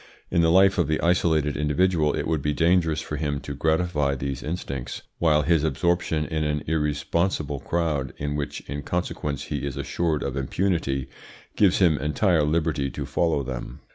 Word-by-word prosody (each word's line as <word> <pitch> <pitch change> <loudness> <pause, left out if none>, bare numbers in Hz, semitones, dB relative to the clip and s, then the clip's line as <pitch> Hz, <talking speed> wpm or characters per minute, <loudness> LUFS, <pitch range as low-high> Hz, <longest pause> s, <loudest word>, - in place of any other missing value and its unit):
In 85 - +3
the 80 - +4
life 95 +2 +5
of 85 - +2
the 80 0 0
isolated 80 -4 +2
individual 75 +1 +2
it - - -2
would 80 -2 0
be 75 +2 0
dangerous 80 -1 +2
for 75 - -5
him 70 -2 -1
to 70 +2 -6
gratify 80 -1 +1
these 70 0 -4
instincts, 70 -6 -5 0.2
while 75 -3 +3
his 80 0 +2
absorption 80 +1 0
in 80 -1 -2
an 75 -1 -1
irresponsible 75 0 -1
crowd, 75 -4 -1
in 75 0 -3
which 75 -1 -4
in 70 +1 -6
consequence 75 -3 -3
he - - -4
is 70 -1 -4
assured 75 +2 -1
of 70 - -3
impunity, 70 -2 -1 0.5
gives 100 -4 +4
him 85 -6 +3
entire 80 +4 +2
liberty 75 -2 0
to 70 +2 -5
follow 70 +1 0
them. 65 -2 -6
75 Hz, 170 wpm, -25 LUFS, 70-85 Hz, 0.5 s, life